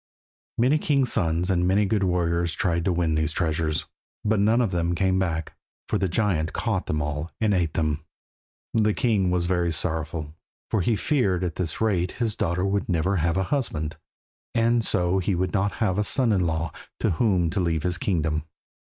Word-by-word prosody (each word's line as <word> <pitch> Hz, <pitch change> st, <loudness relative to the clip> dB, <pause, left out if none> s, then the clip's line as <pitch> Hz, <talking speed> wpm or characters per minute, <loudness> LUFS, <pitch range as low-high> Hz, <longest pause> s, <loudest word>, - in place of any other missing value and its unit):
Many 130 Hz, +6 st, +3 dB
king's 140 Hz, -5 st, +1 dB
sons 85 Hz, -1 st, +1 dB
and 90 Hz, -1 st, +2 dB
many 100 Hz, +3 st, +3 dB
good 100 Hz, +1 st, +1 dB
warriors 85 Hz, -2 st, +1 dB
tried 85 Hz, -3 st, 0 dB
to 95 Hz, -, +2 dB
win 85 Hz, -2 st, +1 dB
these 80 Hz, 0 st, 0 dB
treasures, 80 Hz, -2 st, -1 dB, 0.4 s
but 105 Hz, 0 st, +2 dB
none 110 Hz, +4 st, +3 dB
of 115 Hz, -6 st, +1 dB
them 85 Hz, -1 st, 0 dB
came 95 Hz, +1 st, +2 dB
back, 80 Hz, -4 st, -2 dB, 0.3 s
for -, -, 0 dB
the 95 Hz, -, 0 dB
giant 85 Hz, -4 st, 0 dB
caught -, -, -1 dB
them 75 Hz, -1 st, 0 dB
all 75 Hz, +2 st, -3 dB
and 110 Hz, -2 st, +2 dB
eat 85 Hz, -4 st, 0 dB
them. 75 Hz, -2 st, 0 dB, 0.7 s
The 105 Hz, -2 st, +2 dB
king 105 Hz, -8 st, +2 dB
was 90 Hz, -1 st, +1 dB
very 90 Hz, -1 st, +1 dB
sorrowful, 80 Hz, -2 st, -2 dB, 0.4 s
for 110 Hz, -, +2 dB
he 115 Hz, +5 st, +2 dB
feared 100 Hz, -, +1 dB
that -, -, 0 dB
at 80 Hz, -, -13 dB
this 90 Hz, -3 st, -2 dB
rate 95 Hz, -5 st, +1 dB
his 115 Hz, -3 st, -1 dB
daughter 90 Hz, -2 st, 0 dB
would 100 Hz, +1 st, -1 dB
never 90 Hz, +3 st, +1 dB
get 85 Hz, +2 st, +1 dB
a 95 Hz, -, +2 dB
husband, 80 Hz, -, -2 dB, 0.6 s
and 115 Hz, 0 st, +3 dB
so 90 Hz, -1 st, +2 dB
he 95 Hz, +1 st, 0 dB
would 90 Hz, +2 st, -1 dB
not 100 Hz, 0 st, +1 dB
have 105 Hz, -4 st, 0 dB
a -, -, +2 dB
son 120 Hz, +3 st, +2 dB
in 90 Hz, -3 st, +2 dB
law 80 Hz, 0 st, -1 dB, 0.3 s
to -, -, +1 dB
whom 90 Hz, -3 st, +2 dB
to 100 Hz, -, -1 dB
leave 80 Hz, -4 st, 0 dB
his 90 Hz, -1 st, -1 dB
kingdom. 80 Hz, -5 st, 0 dB
90 Hz, 195 wpm, -25 LUFS, 85-105 Hz, 0.7 s, Many